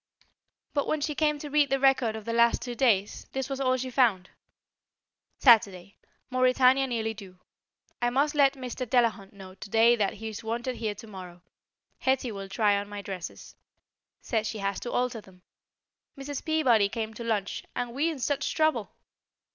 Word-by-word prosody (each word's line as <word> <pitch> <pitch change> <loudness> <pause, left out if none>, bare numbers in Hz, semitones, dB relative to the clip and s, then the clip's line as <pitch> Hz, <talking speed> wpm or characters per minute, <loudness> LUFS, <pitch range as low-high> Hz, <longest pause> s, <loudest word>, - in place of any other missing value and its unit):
But 285 -3 0
when 310 - 0
she 300 +1 -2
came 300 0 +1
to 290 0 -7
read 295 -1 +3
the 270 - +1
record 260 -4 +3
of 220 -1 -8
the 230 - -3
last 235 0 +3
two 245 - -5
days, 220 -6 +1
this 265 +1 -3
was 270 0 -3
all 255 -1 +2
she 255 0 -4
found: 220 -8 +2 1.1
Saturday: 200 -6 +4 0.4
Mauretania 255 +1 +4
nearly 225 -3 -2
due. 195 -4 -12 0.6
I 240 - +2
must 280 +4 +1
let 280 -2 +4
Mr. 255 -1 -6
Delahunt 230 -5 +1
know 190 -2 -12
today 225 +5 +3
that 205 -4 0
he's 220 0 -7
wanted 240 +3 -3
here 215 -2 -3
to 210 - -11
morrow. 180 -4 -11 0.6
Hetty 260 -2 0
will 195 -2 -7
try 205 -1 +2
on 205 0 -7
my 205 -1 -7
dresses. 185 -3 -8 0.7
Says 220 -2 -1
she 220 - -4
has 200 -1 -2
to 240 - -6
alter 245 -2 -1
them. 185 -2 -20 0.7
Mrs. 275 0 -6
Peabody 250 -10 +3
came 220 0 -4
to 235 - -8
lunch, 210 -4 -2
and 245 -1 -3
we 295 +6 +1
in 320 - -4
such 275 +3 -1
trouble! 310 0 0
235 Hz, 175 wpm, -27 LUFS, 205-265 Hz, 1.1 s, Saturday